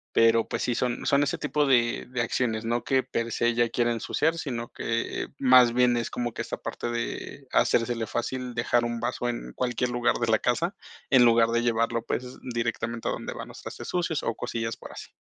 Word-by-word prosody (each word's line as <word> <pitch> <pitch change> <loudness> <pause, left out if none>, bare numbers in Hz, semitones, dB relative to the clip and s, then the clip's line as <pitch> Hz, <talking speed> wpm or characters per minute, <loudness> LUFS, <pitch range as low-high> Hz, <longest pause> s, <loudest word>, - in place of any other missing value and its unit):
pero 115 0 +5
pues - - -3
sí 120 - 0
son 125 0 -1
son 140 +1 +4
ese 145 - -1
tipo 150 -1 +1
de 120 -3 +2
de 125 -1 -1
acciones, 115 -1 -1
¿no?, 120 +1 0
que 130 -1 +2
per 115 -2 -3
se 120 - +1
ella 120 0 +2
quiere 120 0 +1
ensuciar, 150 +8 0
sino 120 -7 -4
que 115 0 -2
más 125 -2 +6
bien 125 0 +4
es 115 - -2
como 120 -1 -3
que - - -4
esta - - -5
parte - - -5
de 120 +3 -5
hacérsele 115 -1 +2
fácil 125 +3 -3
dejar 120 +1 +2
un 120 0 -2
vaso 120 0 -2
en 120 - -5
cualquier 125 0 -1
lugar 120 0 +1
de 120 - -1
la 110 - +4
casa, 170 +10 0 0.3
en 130 -2 +6
lugar 115 -1 +5
de 120 0 +1
llevarlo, 115 0 +1
pues 125 0 -4 0.2
directamente 115 0 -2
a - - 0
donde - - -5
van - - -7
los - - -11
trastes - - -7
sucios 170 -3 -1
o 115 - -1
cosillas 115 -1 -3
por - - -11
así. - - -10
120 Hz, 210 wpm, -27 LUFS, 115-125 Hz, 0.3 s, más